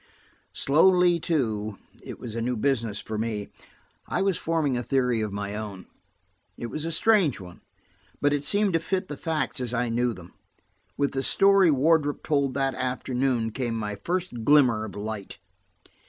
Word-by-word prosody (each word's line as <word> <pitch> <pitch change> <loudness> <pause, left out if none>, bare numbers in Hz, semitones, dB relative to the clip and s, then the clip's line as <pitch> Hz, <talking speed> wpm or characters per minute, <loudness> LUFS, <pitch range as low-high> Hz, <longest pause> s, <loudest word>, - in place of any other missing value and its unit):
Slowly, 175 +4 +4
too–it 110 - -3
was 115 - -7
a 115 - -3
new 125 +1 -1
business 115 -4 0
for 110 -1 -5
me–I 110 - -5
was 195 -2 +1
forming 160 -6 0
a 120 - -1
theory 125 -3 +1
of 105 -1 -2
my 100 0 -4
own. 105 -4 -6 0.7
It 120 - -6
was 155 +1 -3
a 165 - -2
strange 180 - +3
one, 90 -2 -12 0.6
but 145 0 +2
it 145 -1 -1
seemed 200 +5 +2
to 165 - +3
fit 185 +3 -2
the 145 - -4
facts 155 -4 -2
as 125 -1 -3
I 120 0 0
knew 120 0 0
them. 90 -1 -13 0.6
With 140 -1 +1
the 135 - -2
story 195 +4 +4
Wardrop 145 +1 +2
told 140 -4 0
that 135 -1 0
afternoon 125 -2 -1
came 120 0 -2
my 105 -2 -3
first 170 - -3
glimmer 125 -5 +4
of 105 - -9
light. 105 -1 -6
130 Hz, 165 wpm, -26 LUFS, 110-155 Hz, 0.7 s, Slowly